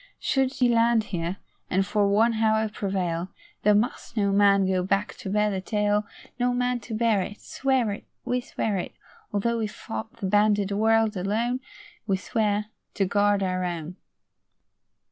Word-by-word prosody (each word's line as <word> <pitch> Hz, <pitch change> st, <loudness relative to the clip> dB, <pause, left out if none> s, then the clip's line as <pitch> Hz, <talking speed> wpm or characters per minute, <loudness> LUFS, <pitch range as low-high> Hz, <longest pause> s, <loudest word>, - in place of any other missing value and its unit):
Should 265 Hz, -2 st, 0 dB
he 250 Hz, -, +2 dB
land 230 Hz, -1 st, +3 dB
here, 170 Hz, +2 st, -2 dB, 0.3 s
and 190 Hz, +1 st, +2 dB
for 205 Hz, 0 st, +2 dB
one 220 Hz, +4 st, +3 dB
hour 220 Hz, 0 st, +2 dB
prevail, 185 Hz, -4 st, -2 dB, 0.3 s
There 210 Hz, 0 st, +4 dB
must 230 Hz, +2 st, -1 dB
no 200 Hz, -2 st, +2 dB
man 200 Hz, -1 st, +4 dB
go 185 Hz, -1 st, +1 dB
back 195 Hz, +3 st, 0 dB
to 220 Hz, -7 st, -6 dB
bear 210 Hz, +1 st, +2 dB
the 190 Hz, -1 st, -2 dB
tale: 210 Hz, 0 st, 0 dB, 0.3 s
No 245 Hz, 0 st, +2 dB
man 250 Hz, 0 st, 0 dB
to 225 Hz, 0 st, -6 dB
bear 220 Hz, -3 st, +2 dB
it 205 Hz, +3 st, -6 dB
Swear 260 Hz, -5 st, 0 dB
it! 200 Hz, -, -7 dB, 0.2 s
We 250 Hz, 0 st, 0 dB
swear 215 Hz, -4 st, -2 dB
it! 180 Hz, -, -5 dB, 0.4 s
Although 230 Hz, +3 st, 0 dB
we 220 Hz, -, 0 dB
fought 110 Hz, -, -7 dB
the 220 Hz, -, -4 dB
banded 205 Hz, 0 st, +3 dB
world 220 Hz, +1 st, +2 dB
alone, 220 Hz, +7 st, -1 dB, 0.5 s
We 195 Hz, -2 st, +2 dB
swear 210 Hz, +1 st, -1 dB, 0.2 s
to 195 Hz, -, +2 dB
guard 205 Hz, +1 st, +2 dB
our 185 Hz, -1 st, -1 dB
own. 175 Hz, -1 st, -4 dB
210 Hz, 165 wpm, -26 LUFS, 195-225 Hz, 0.5 s, There